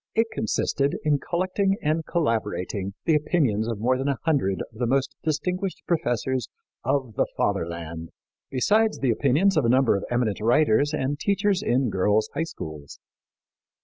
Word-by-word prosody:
It 225 0 +2
consisted 145 -10 0
in 150 -2 +2
collecting 185 +5 0
and 155 -2 0
collaborating 105 - -2
the 165 - +3
opinions 145 - +1
of 115 -2 -2
more 125 +4 +1
than 135 - -1
a 140 -2 0
hundred 135 - +1
of 110 - -15
the 120 - +1
most 135 +2 0
distinguished 180 +5 -2
professors 130 - -1 0.3
of 130 -5 0
the - - +1
Fatherland, 85 -1 -2 0.4
besides 210 - +2
the 130 -3 +1
opinions 150 - +2
of 155 - +3
a - - +3
number 130 -2 +4
of 100 - -2
eminent 120 -4 0
writers 120 +4 +3
and 145 -1 -2
teachers 200 0 +1
in 130 - +1
girls' 105 +3 +1
high 145 - -1
schools. 75 - -8
135 Hz, 155 wpm, -25 LUFS, 110-165 Hz, 0.4 s, number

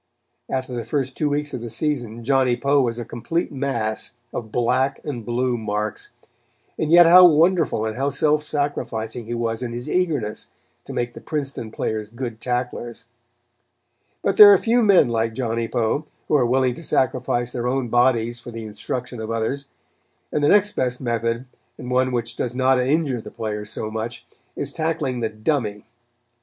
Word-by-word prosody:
After 130 -1 -3
the 120 -1 -3
first 130 +2 -2
two 150 - 0
weeks 145 0 -1
of 125 - -4
the 120 - -6
season, 120 -3 -2
Johnny 130 -1 +2
Poe 140 0 +3
was 120 -2 -1
a 120 - -5
complete 120 +10 -3
mass 120 -5 -2 0.2
of 110 -2 -5
black 125 +3 +1
and 130 -6 -4
blue 120 +1 -1
marks; 105 -1 -3 0.7
and 155 - 0
yet 175 +1 +8
how 180 +2 +9
wonderful 165 -7 +3
and 110 0 -3
how 135 +2 0
self 150 +2 +2
sacrificing 140 -6 -3
he 120 +2 -4
was 115 0 -2
in 120 -2 -4
his 120 +1 -5
eagerness 150 -13 -1 0.4
to - - -7
make 120 0 -2
the - - -10
Princeton 140 -7 -4
players 110 -1 -3
good 115 -1 -6
tacklers. 125 -1 -3 1.2
But 195 - 0
there 205 -1 +11
are 200 - +7
few 235 +5 +2
men 200 - +5
like 115 -1 -1
Johnny 115 -2 -1
Poe, 120 +7 0 0.2
who - - +2
are 125 -4 +3
willing 130 0 +2
to 165 - -10
sacrifice 125 -3 0
their 120 0 -3
own 130 -1 -1
bodies 120 -1 +2
for 120 - -10
the 115 -1 -7
instruction 115 +4 -5
of 110 0 -5
others; 115 +5 -2 0.7
and 150 - 0
the - - +4
next 205 0 +5
best 125 -6 -1
method, 115 0 -1 0.3
and 125 - -7
one 130 0 +2
which 120 -1 -2
does 125 0 -3
not 130 0 +3
injure 135 -1 +1
the - - -9
players 105 -1 -5
so 110 -1 -4
much, 110 +2 -5 0.3
is - - -3
tackling 155 -6 -1
the 115 -2 -1
"dummy." 110 -2 -2
125 Hz, 180 wpm, -22 LUFS, 115-140 Hz, 1.2 s, there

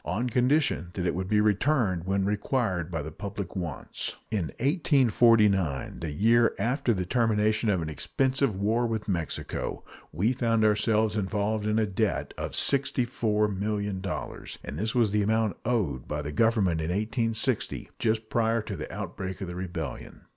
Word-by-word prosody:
on 120 +4 -1
condition 125 - +2
that 90 - -2
it 85 - +1
should 95 +1 -2
be 105 +1 +3
returned 105 - +2
when 95 0 +1
required 105 - 0
by 80 -4 -3
the 80 - -6
public 100 +4 -6
wants. 85 -7 -4 0.2
In 100 -6 0
1849 115 - +3
the 80 - -3
year 115 +9 +3
after 125 +5 +1
the 90 -5 0
termination 110 0 +2
of 95 -5 +1
an 80 - -4
expensive 130 - 0
war 110 +5 +1
with 110 -2 -3
Mexico 85 -6 -3 0.3
we 100 +11 +1
found 115 -3 +2
ourselves 110 0 +2
involved 105 +1 -1
in 105 +1 +1
a 110 - +3
debt 100 - -1
of - - -5
$64,000,000; 105 -7 -1
and 70 +4 -6
this 110 +4 -2
was 115 -4 +3
the 105 0 +2
amount 110 0 +1
owed 110 - 0
by 75 0 -3
the 75 - -4
Government 95 -3 +2
in 80 - -2
1860, 115 +4 -1
just 110 -1 0
prior 115 0 +1
to 100 - -5
the 75 - -6
outbreak 95 -1 -5
of 95 - -4
the 90 - -5
rebellion. 85 -7 -6
105 Hz, 160 wpm, -27 LUFS, 95-115 Hz, 0.3 s, be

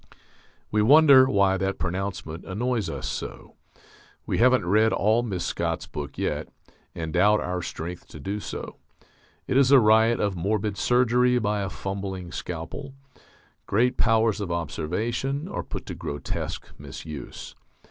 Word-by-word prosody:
_ - - -28 0.6
We 105 - +2
wonder 135 +1 +7
why 100 -4 +3
that 95 +1 -1
pronouncement 90 -3 -4
annoys 110 -1 -1
us - - -5
so. - - -6 0.7
We - - -1
haven't 125 -4 +4
read 110 +5 +3
all 110 +4 +2
Mrs. 95 -7 -3
Scott's - - -2
book 75 -1 -7
yet, - - -2 0.5
and 80 -2 -4
doubt 105 +4 +4
our 90 0 -3
strength 85 +1 -6
to 75 - -11
do 100 +8 -3
so. - - -7 0.7
It 130 - 0
is 135 -2 +5
a 140 -1 +8
riot 110 +1 +4
of 100 -2 0
morbid 100 +3 -1
surgery 125 +2 +3
by 105 -3 0
a 95 - -2
fumbling 95 -2 -5
scalpel: 90 - -6 0.7
great 120 +5 +2
powers 115 -2 +2
of 95 -4 -3
observation 110 - -2
are - - -4
put - - -7
to - - -6
grotesque 70 - -5
misuse. 75 -3 -8
105 Hz, 145 wpm, -25 LUFS, 90-120 Hz, 0.7 s, a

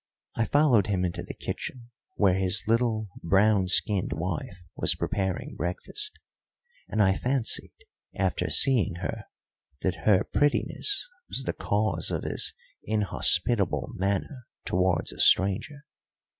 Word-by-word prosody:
I 115 - +1
followed 135 -9 +3
him 95 -3 0
into 85 - -4
the - - -8
kitchen, 120 -2 -6 0.2
where 100 -3 +3
his 95 +2 0
little 115 -2 +1
brown 95 +2 +3
skinned 95 +1 +2
wife 90 +3 -4 0.2
was - - +1
preparing 95 -2 -3
breakfast, 255 - -1 0.8
and 110 -1 +2
I 95 -1 +3
fancied, 125 -1 0 0.4
after 90 -3 -1
seeing 115 - +3
her, 90 - -5 0.6
that 95 +2 -3
her 95 -3 +5
prettiness 145 - 0 0.2
was 135 - -2
the - - -2
cause 100 -5 0
of - - -3
his - - +2 0.3
inhospitable 105 -1 +1
manner 100 +7 -3 0.2
towards 90 -2 +1
a - - -12
stranger. 120 +10 +3
100 Hz, 125 wpm, -27 LUFS, 95-120 Hz, 0.8 s, her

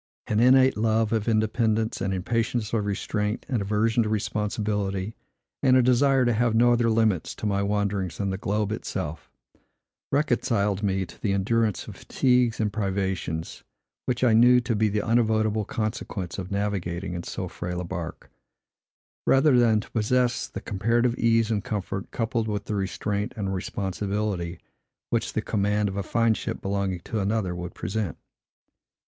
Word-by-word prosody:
An 105 - 0
innate 130 +1 +5
love 110 0 +1
of 110 -1 0
independence, 110 0 +1
an 95 0 0
impatience 110 +3 -1
of 105 -3 0
restraint, 105 +2 -2
an 125 -6 -1
aversion 110 +3 +1
to 110 - 0
responsibility, 105 -1 -1 0.5
and 130 -2 +5
a 130 - +5
desire 130 +1 +4
to 120 - +3
have 115 0 +1
no 120 +1 +5
other 120 -1 +2
limits 110 -6 +1
to - - -6
my 100 -1 +1
wanderings 100 -3 -1
than 100 -2 -1
the 95 - -2
globe 105 +1 -1
itself, 80 -7 -4 0.8
reconciled 115 -8 +1
me 95 -2 0
to 85 - -16
the 100 - +1
endurance 105 +1 0
of - - -8
fatigues 125 -3 +1
and 105 -2 0
privations, 95 -5 -2 0.4
which 125 0 -1
I 120 -3 +5
knew 125 +2 +7
to 120 -1 -1
be 110 0 +2
the 105 0 -1
unavoidable 110 -2 +2
consequence 110 -7 -4
of 90 -1 -5
navigating 95 -3 -2
in 85 - -3
so - - -5
frail 90 0 -5
a - - -3
bark, 85 - -6 1.0
rather 135 -1 +5
than 110 -3 +4
to - - -15
possess 125 +2 +1
the - - -7
comparative 115 +4 +1
ease 115 -1 +3
and 105 -2 0
comfort, 100 -2 -4
coupled 115 -1 -1
with 105 -2 -2
the - - -3
restraint 100 +1 -2
and 95 -2 -2
responsibility, 95 -1 -2 0.5
which - - 0
the - - -1
command 105 0 +1
of 95 - -4
a 100 - -1
fine 115 +2 +2
ship - - -4
belonging 95 -2 -2
to 110 +4 -3
another 100 -2 0
would 90 0 -6
present. 95 -3 -3
105 Hz, 165 wpm, -26 LUFS, 100-115 Hz, 1.0 s, knew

